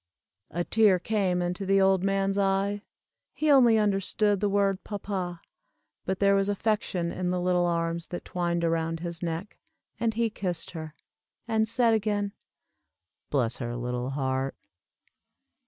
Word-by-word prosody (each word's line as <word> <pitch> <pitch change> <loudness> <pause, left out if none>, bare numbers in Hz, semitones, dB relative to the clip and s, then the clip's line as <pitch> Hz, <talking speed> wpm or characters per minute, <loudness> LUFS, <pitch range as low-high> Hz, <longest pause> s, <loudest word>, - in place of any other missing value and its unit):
A 175 +2 -2
tear 210 -1 +4
came 185 -2 0
into 175 +2 -2
the 195 +1 +3
old 190 -1 +4
man's 195 0 +1
eye, 195 +1 +1 0.5
he 305 -1 +1
only 245 -5 +6
understood 205 0 +1
the 205 +1 +1
word 195 -1 +1
papa, 190 -4 -4 0.7
but 190 - -1
there 200 +1 +4
was 195 0 +2
affection 200 -4 -1
in 180 -1 -2
the 180 0 0
little 180 0 +2
arms 170 0 -1
that 175 - -6
twined 170 -1 -1
around 165 0 0
his 170 -1 -5
neck, 170 +3 -4 0.4
and 225 -1 0
he 230 -1 +1
kissed 180 -5 -3
her, 160 -3 -7 0.5
and 220 -1 +1
said 230 -1 +3
again, 205 -2 0 1.0
"Bless 125 -5 +1
her 120 -1 -4
little 125 +1 -3
heart." 135 -1 -1
190 Hz, 145 wpm, -27 LUFS, 170-205 Hz, 1.0 s, only